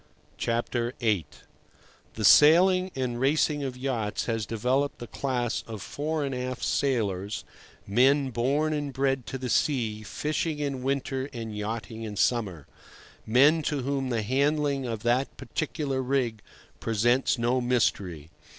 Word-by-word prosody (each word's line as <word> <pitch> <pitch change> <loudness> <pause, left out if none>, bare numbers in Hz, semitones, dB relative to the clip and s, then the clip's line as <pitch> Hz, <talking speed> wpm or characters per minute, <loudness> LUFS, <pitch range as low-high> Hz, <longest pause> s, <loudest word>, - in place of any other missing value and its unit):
VIII. 115 - 0 0.9
The - - -1
sailing 185 +5 +6
and 125 -2 -2
racing 145 +2 +2
of 130 -2 -4
yachts 120 -5 -2
has 115 -3 -2
developed 130 +6 0
a 120 - -6
class 125 -1 -2
of 110 -2 -6
fore 150 0 -2
and 135 - -3
aft 125 0 -4
sailors, 110 -5 0 0.4
men 130 +6 +3
born 140 +6 +1
and 145 -2 -2
bred 135 -1 0
to 135 - -4
the 130 -1 -4
sea, 115 -5 0
fishing 150 +7 -2
in 140 -3 -3
winter 135 0 -2
and 115 -3 -6
yachting 110 +1 -4
in 110 -2 -5
summer; 100 - 0 0.6
men 140 +8 +5
to 145 -2 -1
whom 135 0 -1
the 115 -3 0
handling 140 +2 +1
of 115 -2 -4
that 125 +3 +1
particular 140 -3 -2
rig 125 -4 -1 0.4
presents 120 +5 +2
no 120 +2 +1
mystery. 95 -10 0
125 Hz, 135 wpm, -27 LUFS, 115-140 Hz, 0.9 s, sailing